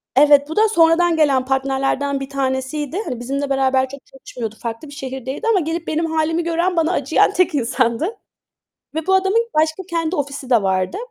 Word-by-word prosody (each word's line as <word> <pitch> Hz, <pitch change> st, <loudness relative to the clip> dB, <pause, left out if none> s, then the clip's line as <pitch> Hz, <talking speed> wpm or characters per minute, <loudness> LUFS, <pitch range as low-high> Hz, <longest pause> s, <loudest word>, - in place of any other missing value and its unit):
Evet, 290 Hz, +1 st, +5 dB
bu 320 Hz, -, -5 dB
da 435 Hz, +1 st, +4 dB
sonradan 335 Hz, -2 st, +4 dB
gelen 280 Hz, -5 st, +2 dB
partnerlerden 270 Hz, +1 st, 0 dB
bir 270 Hz, -, -6 dB
tanesiydi. 275 Hz, +3 st, -2 dB
Hani 245 Hz, -2 st, -4 dB
bizimle 275 Hz, +3 st, -3 dB
beraber 265 Hz, -1 st, +1 dB
çok 280 Hz, +1 st, -11 dB
çalışmıyordu, 235 Hz, -4 st, -8 dB
farklı 230 Hz, +5 st, -5 dB
bir 285 Hz, -, -11 dB
şehirdeydi 265 Hz, -, -5 dB
ama 450 Hz, -4 st, +4 dB
gelip 335 Hz, +1 st, -3 dB
benim 320 Hz, +1 st, 0 dB
hâlimi 320 Hz, +1 st, 0 dB
gören, 340 Hz, +2 st, 0 dB
bana 330 Hz, 0 st, +2 dB
acıyan 305 Hz, 0 st, +2 dB
tek 365 Hz, -4 st, +1 dB
insandı 255 Hz, -, 0 dB, 0.8 s
ve 320 Hz, +1 st, -3 dB
bu 380 Hz, -, +3 dB
adamın, 390 Hz, +5 st, +2 dB
başka 315 Hz, +4 st, +1 dB
kendi 335 Hz, 0 st, -1 dB
ofisi 280 Hz, -3 st, -4 dB
de 235 Hz, -4 st, +4 dB
vardı. 185 Hz, -1 st, -1 dB
285 Hz, 180 wpm, -19 LUFS, 265-330 Hz, 0.8 s, Evet